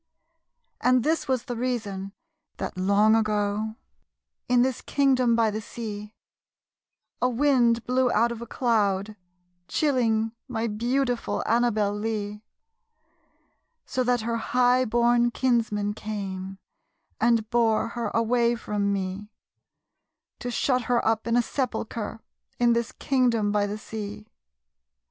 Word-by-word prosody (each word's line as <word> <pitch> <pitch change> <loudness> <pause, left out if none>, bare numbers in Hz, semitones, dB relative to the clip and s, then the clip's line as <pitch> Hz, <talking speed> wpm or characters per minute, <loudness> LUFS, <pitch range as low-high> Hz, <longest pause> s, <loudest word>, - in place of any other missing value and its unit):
And 250 -1 +3
this 320 +3 0
was 260 -3 0
the 245 - -5
reason 215 -6 -3 0.5
that, - - -4
long 200 +4 +4
ago, 215 0 0 0.7
In 245 -1 +5
this 260 -2 -1
kingdom 260 -4 +2
by 225 -2 +2
the 215 +1 -4
sea, 210 -1 -7 1.1
A 250 - +3
wind 240 -3 +2
blew 250 0 +2
out 235 +2 +3
of 235 -1 -6
a 235 - -7
cloud, 210 -4 0 0.5
chilling 225 -7 +1 0.2
My 230 -3 -2
beautiful 245 +3 -1
Annabel 220 -4 +2
Lee; 210 -1 -3 1.4
So 255 - -1
that 245 -1 +1
her 230 +1 -1
highborn 240 0 +3
kinsmen 225 -5 0
came 195 -3 -5 0.6
And 230 -2 +2
bore 230 -2 +2
her 235 -1 -3
away 235 +2 +2
from 205 -3 -1
me, 195 +1 -3 1.1
To 245 - -4
shut 250 0 0
her 245 -1 +1
up 225 0 +1
in 230 +1 +2
a 245 - +3
sepulchre 230 -4 -3 0.4
In 240 -1 +4
this 235 0 -1
kingdom 240 -6 +1
by 205 0 +1
the 205 +1 -4
sea. 210 -1 -7
230 Hz, 120 wpm, -26 LUFS, 210-245 Hz, 1.4 s, In